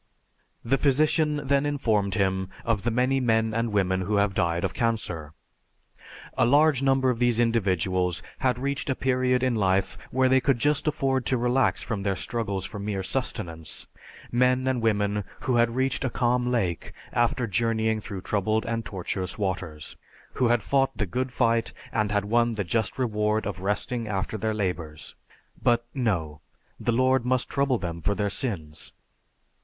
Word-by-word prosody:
The 135 +4 +2
physician 150 +1 +2
then 140 +1 +2
informed 110 -10 0
him 95 -2 0 0.2
of 115 -4 +1
the 120 - 0
many 125 +3 +2
men 110 -3 +2
and 115 0 0
women 95 -2 +1
who 100 +3 -1
have 100 -1 +2
died 85 -2 0
of 95 -1 -1
cancer. 90 -10 -2 1.0
A - - +3
large 145 +2 +4
number 135 -1 +3
of 115 - -4
these 120 -2 +2
individuals 95 -6 +1 0.2
had 125 -2 +1
reached 140 +2 -2
a 130 - +1
period 130 -1 +1
in 130 -1 +2
life 95 -3 +1
where 130 0 +2
they 130 0 +4
could 135 -1 +2
just 145 +5 +1
afford 135 -5 0
to 130 - +2
relax 125 +2 +2
from 105 -5 -3
their 100 -1 0
struggles 100 0 -3
for 105 - -7
mere 100 -1 -3
sustenance; 85 - -4 0.5
men 125 +1 +3
and 130 -2 0
women 105 -2 +1 0.2
who 125 -2 +1
had 115 0 +2
reached 130 +1 0
a 130 - 0
calm 125 0 +1
lake 95 -10 -1 0.2
after 120 +1 +1
journeying 110 +1 0
through 100 -2 -7
troubled 110 +3 0
and 115 -1 -2
tortuous 95 -2 -4
waters; 90 -7 -4 0.4
who 125 - +2
had 120 -2 +2
fought 135 +1 +1
the 105 - 0
"good 130 +8 -2
fight," 115 -2 +1 0.2
and 105 -1 0
had 105 -1 +1
won 115 +2 +2
the 100 - -1
just 110 +5 -1
reward 105 -3 0
of 100 -4 -4
resting 105 +4 -2
after 105 +1 -2
their 110 +1 -1
labors. 90 -7 -4 0.5
But 120 0 +2
no, 85 - -1 0.4
the - - 0
Lord 130 +2 +3
must 125 0 0
trouble 140 -2 +1
them 85 -4 -5
for 100 +5 0
their 100 -1 -1
sins. 80 - -3
115 Hz, 170 wpm, -26 LUFS, 100-130 Hz, 1.0 s, large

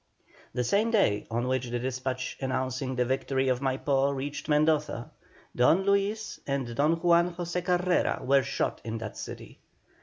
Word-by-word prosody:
The 125 - +1
same 205 - +2
day 200 - +2
on 120 +2 -1
which 130 -1 0
the 120 - -1
despatch 130 +1 -3
announcing 130 0 -2
the 125 0 +1
victory 130 +1 0
of 125 -1 +1
Maipó 135 +1 +1
reached 140 +3 -5
Mendoza, 150 -5 +1 0.4
Don 160 +10 +4
Luis 200 +2 0
and 135 -4 -2
Don 150 +5 +3
Juan 170 +1 +3
José 175 0 -3
Carrera 180 0 +1
were 135 +1 +4
shot 135 +1 -2
in 115 0 -4
that 110 -2 -6
city. - - -8
135 Hz, 155 wpm, -28 LUFS, 130-170 Hz, 0.4 s, Don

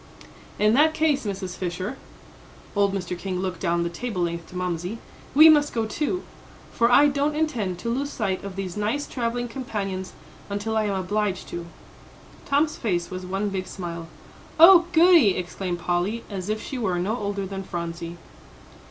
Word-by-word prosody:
"In 210 +1 +4
that 310 +5 +4
case, 295 -6 +1
Mrs. 190 -2 -4
Fisher," 185 +6 -4 0.8
old 200 -1 +3
Mr. 185 -2 -3
King 180 +1 -4
looked 185 -2 -3
down 170 -1 +1
the - - -1
table 185 0 -3
length 170 -1 -3
to - - -13
Mamsie, 180 +3 -3 0.4
"we 310 +3 +10
must 295 -2 +5
go 225 -1 +1
too; 300 - -2 0.5
for 235 +1 +2
I 280 +4 +7
don't 290 +1 +1
intend 240 - -1
to 230 +6 -2
lose 280 +3 -2
sight 190 -8 -2
of 200 -2 -6
these 190 -3 -4
nice 215 +8 -1
travelling 245 0 -2
companions 200 -7 -4 0.4
until 205 +2 -2
I 220 -1 +2
am 200 -1 -1
obliged 195 +1 -1
to." 170 0 -6 0.8
Tom's 295 +2 +2
face 175 -6 -1
was 185 0 -6
one 195 +2 -1
big 190 -1 -3
smile. 170 -3 -6 0.5
"Oh, 345 +1 +9
goody!" 335 - +6
exclaimed 180 0 -3
Polly, 180 +6 -1
as 190 0 -4
if 215 0 -1
she 265 - -5
were 190 -6 0
no 195 +6 0
older 200 -2 -3
than 195 0 -5
Phronsie. 170 -2 -5
200 Hz, 170 wpm, -25 LUFS, 180-245 Hz, 0.8 s, we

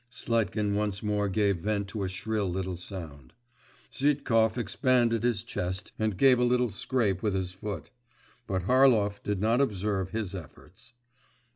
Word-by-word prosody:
Sletkin 110 -4 -1
once 105 -1 -1
more 105 -1 0
gave 100 -1 +2
vent 100 +3 -1
to 105 0 -4
a 95 - -1
shrill 100 +1 -2
little 95 0 -3
sound; 80 -8 -8 0.6
Zhitkov 125 -6 +2
expanded 120 0 +2
his 115 -3 0
chest 95 -4 -4
and 110 -4 0
gave 130 +2 +5
a - - +3
little 125 -1 +2
scrape 100 -2 0
with 105 -3 0
his 95 -1 -2
foot; 100 +2 -6 0.6
but 95 -2 -1
Harlov 115 -3 +4
did 105 -2 -2
not 115 +6 +2
observe 100 -6 -1
his 110 -3 -3
efforts. 95 - -11
105 Hz, 150 wpm, -28 LUFS, 95-115 Hz, 0.6 s, gave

